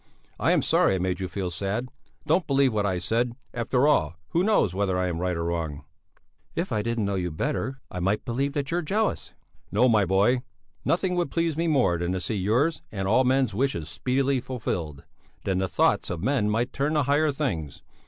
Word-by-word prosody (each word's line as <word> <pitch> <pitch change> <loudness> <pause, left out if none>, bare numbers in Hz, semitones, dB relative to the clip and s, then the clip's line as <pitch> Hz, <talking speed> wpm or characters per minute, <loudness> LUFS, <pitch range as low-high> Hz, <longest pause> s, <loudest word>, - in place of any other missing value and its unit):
I - - +3
am - - +3
sorry 95 - +3
I - - +1
made 90 0 -1
you 95 - -2
feel 95 -1 -3
sad; 100 +8 -3 0.4
don't 180 -3 +2
believe 135 -3 +3
what 105 -1 +1
I 95 -2 0
said; 115 +6 0 0.2
after 125 +4 +1
all, 85 - +2
who 170 - +1
knows 200 - +3
whether 95 -1 0
I 90 - +1
am 85 -2 -2
right 90 -1 -1
or 85 - -2
wrong?" 80 -4 -3 0.7
"If 170 -1 -2
I 110 -2 +1
didn't 115 -1 -1
know 100 - -1
you 90 -2 -1
better, 130 - -3
I 90 - -4
might 95 +4 0
believe 130 +4 0
you - - -12
that 145 0 -2
you're 175 +1 +1
jealous." 210 +7 -1 0.4
"No, 110 +6 +4
my 110 -4 +4
boy; 100 +7 +3 0.4
nothing 180 +2 +1
would 175 - 0
please 165 -2 0
me 165 +2 0
more 125 - +2
than 85 +1 -1
to 95 - -1
see 100 - -3
yours 115 - +1
and 95 -2 -3
all 115 +6 +4
men's 130 -2 +2
wishes 100 - -1
speedily 130 +9 0
fulfilled; 85 - -4 0.4
then 95 -1 0
the 95 - 0
thoughts 85 - +2
of 85 0 -4
men 125 -4 +1
might 120 +4 0
turn 145 +3 0
to 150 - +3
higher 145 +3 +2
things. 85 - -3
110 Hz, 210 wpm, -26 LUFS, 90-140 Hz, 0.7 s, No